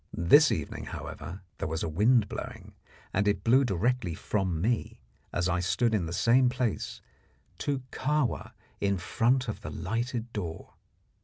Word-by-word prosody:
This 145 Hz, -, +6 dB
evening, 75 Hz, -, -3 dB
however, 90 Hz, +2 st, -7 dB, 0.2 s
there -, -, -1 dB
was 80 Hz, 0 st, -2 dB
a -, -, -1 dB
wind 105 Hz, +7 st, +3 dB
blowing, -, -, -7 dB, 0.4 s
and 100 Hz, +2 st, +2 dB
it 100 Hz, -2 st, +1 dB
blew 130 Hz, +4 st, +5 dB
directly 105 Hz, -3 st, 0 dB
from 95 Hz, -2 st, -1 dB
me, 115 Hz, +6 st, -1 dB, 0.3 s
as 90 Hz, -, 0 dB
I 90 Hz, 0 st, +1 dB
stood 110 Hz, +6 st, +1 dB
in 95 Hz, -6 st, +1 dB
the -, -, -5 dB
same 120 Hz, +8 st, +4 dB
place, 125 Hz, -4 st, -2 dB, 0.6 s
to 140 Hz, -3 st, -1 dB
Kahwa 150 Hz, -2 st, -1 dB, 0.3 s
in 100 Hz, -1 st, +1 dB
front 120 Hz, +8 st, +1 dB
of 105 Hz, -2 st, -4 dB
the 105 Hz, -, -6 dB
lighted 115 Hz, +6 st, -3 dB
door. 85 Hz, -6 st, -5 dB
105 Hz, 155 wpm, -29 LUFS, 90-125 Hz, 0.6 s, This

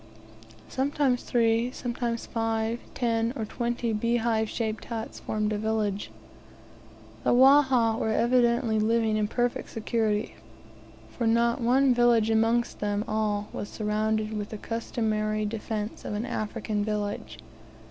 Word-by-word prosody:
Sometimes 265 Hz, -2 st, 0 dB
three, 230 Hz, 0 st, +2 dB
sometimes 240 Hz, -2 st, -3 dB
five, 225 Hz, 0 st, -1 dB, 0.2 s
ten, 230 Hz, -1 st, 0 dB
or 225 Hz, -5 st, -3 dB
twenty 235 Hz, 0 st, -2 dB
beehive 225 Hz, 0 st, +1 dB
shaped 220 Hz, -2 st, -3 dB
huts 225 Hz, -1 st, -5 dB
formed 215 Hz, 0 st, -1 dB
a 205 Hz, -, -2 dB
village. 215 Hz, -2 st, -1 dB, 1.1 s
The -, -, +3 dB
Wahha 260 Hz, -4 st, +5 dB
were -, -, 0 dB
evidently 235 Hz, 0 st, +2 dB
living 220 Hz, 0 st, +2 dB
in 215 Hz, -1 st, +1 dB
perfect 245 Hz, +2 st, -1 dB
security, 220 Hz, -1 st, -1 dB, 0.8 s
for 235 Hz, -, -2 dB
not 235 Hz, +1 st, +2 dB
one 255 Hz, +2 st, +4 dB
village 235 Hz, -2 st, +3 dB
amongst 225 Hz, +2 st, +1 dB
them 205 Hz, +1 st, -1 dB
all 210 Hz, -1 st, -1 dB
was 205 Hz, -, -5 dB
surrounded 215 Hz, 0 st, -1 dB
with 210 Hz, -1 st, -4 dB
the 215 Hz, -, -6 dB
customary 215 Hz, -1 st, -2 dB
defence 215 Hz, 0 st, -4 dB
of -, -, -4 dB
an 215 Hz, +3 st, -2 dB
African 215 Hz, -3 st, -2 dB
village. 210 Hz, -1 st, -3 dB
225 Hz, 125 wpm, -27 LUFS, 215-235 Hz, 1.1 s, Wahha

